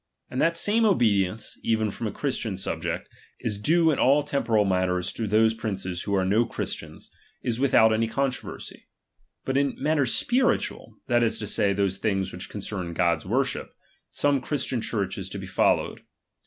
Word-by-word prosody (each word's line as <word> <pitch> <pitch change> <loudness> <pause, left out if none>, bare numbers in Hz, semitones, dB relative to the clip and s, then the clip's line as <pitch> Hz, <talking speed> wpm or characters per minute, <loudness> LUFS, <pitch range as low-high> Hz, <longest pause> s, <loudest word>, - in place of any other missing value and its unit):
And 130 - -1
that 165 - +3
the - - -4
same 215 +6 +2
obedience, 110 - +1
even 110 -2 +1
from 115 - -4
a - - -3
Christian 115 -6 -2
subject, 85 -3 -3 0.3
is 105 -3 -3
due 165 +6 +4
in 145 - -1
all 140 +3 +4
temporal 115 -7 +1
matters 90 -1 0
to 115 - -3
those 110 +2 +4
princes 95 -5 -4
who 100 - -1
are 95 -1 +2
no 105 +5 +3
Christians, - - -6 0.3
is 120 -1 -1
without 110 -5 +5
any 115 +1 +1
controversy; 130 -4 -4 0.6
but 135 0 0
in 140 -1 +1
mat 155 +1 +1
ters 135 -4 +1
spiritual, 255 +2 0
that 120 -1 +2
is 115 -1 +2
to 105 - -4
say, 100 0 +1
those 100 -1 0
things 95 -2 -1
which - - -7
concern 90 -4 -5
God's 85 -2 +1
worship, - - -1 0.3
some 145 -2 +1
Christian 130 -3 -1
Church 100 -4 -2
is - - -6
to - - -6
be - - -6
followed. - - +1
110 Hz, 180 wpm, -26 LUFS, 95-135 Hz, 0.6 s, without